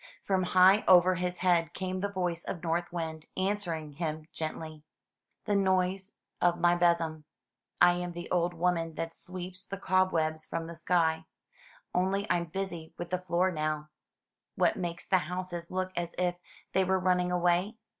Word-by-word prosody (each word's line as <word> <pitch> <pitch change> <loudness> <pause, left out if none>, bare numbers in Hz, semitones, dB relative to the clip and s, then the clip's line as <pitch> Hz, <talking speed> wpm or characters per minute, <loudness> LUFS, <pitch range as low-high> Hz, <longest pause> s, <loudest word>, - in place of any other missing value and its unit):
'' - - -31
From 190 -1 +2 0.2
high 190 +3 +7
over 185 0 +7
his 180 0 -2
head 170 -2 +3
came 185 0 -3
the 200 - 0
voice 180 -3 -2
of 170 - -5
North 170 +1 -1
Wind, 160 -2 -5
answering 185 -6 -1
him 155 0 -4
gently: 155 -1 -5 0.6
"The 205 - +1
noise 190 0 +1 0.3
of 175 0 +3
my 175 0 +4
besom. 170 -3 +1 0.5
I 175 - +7
am 175 0 -3
the 175 0 -6
old 175 -1 +1
woman 165 -2 0
that 165 +1 -4
sweeps 185 +1 -5
the 195 0 -6
cobwebs 170 -5 +1
from 165 - -4
the 170 +1 -8
sky; 165 -1 +1 0.7
only 190 +3 +1
I'm 170 -1 +1
busy 170 -2 -5
with 175 0 -6
the 180 - 0
floor 180 +1 +1
now." 155 -1 -2 0.6
"What - - +3
makes 175 -2 -4
the 185 - +4
houses 175 0 -5
look 185 0 -2
as 175 -1 -3
if 180 0 +1 0.4
they 190 - +4
were 190 +1 +2
running 180 -1 +1
away?" 180 +4 +2
175 Hz, 165 wpm, -30 LUFS, 165-185 Hz, 0.7 s, high